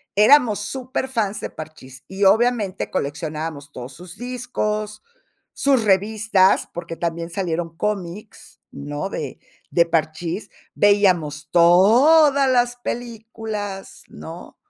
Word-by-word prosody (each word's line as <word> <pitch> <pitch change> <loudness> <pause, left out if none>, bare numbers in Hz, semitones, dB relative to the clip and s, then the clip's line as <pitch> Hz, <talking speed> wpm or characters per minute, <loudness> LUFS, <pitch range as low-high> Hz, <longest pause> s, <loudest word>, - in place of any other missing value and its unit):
éramos 215 -1 +5
superfans 250 -3 -3
de - - -4
Parchís. 135 -4 -11
Y 195 +1 -4
obviamente, 210 -1 +2
coleccionábamos 150 0 -4
todos 125 +1 -8
sus 175 +5 -12
discos, 215 -4 -4 0.5
sus 270 -4 +2
revistas, 205 -1 +2
porque 170 -1 -6
también 165 0 -3
salieron 170 -2 -3
cómics, 205 +2 -5
¿no?, 145 +7 -5
de 145 -8 -6 0.3
de 170 - +3
Parchís, 165 +3 -2 0.3
veíamos 175 -8 +2
todas 260 - +5
las 245 -1 +2
películas, 225 -4 -6
¿no? 165 +2 -11
195 Hz, 100 wpm, -21 LUFS, 165-225 Hz, 0.5 s, éramos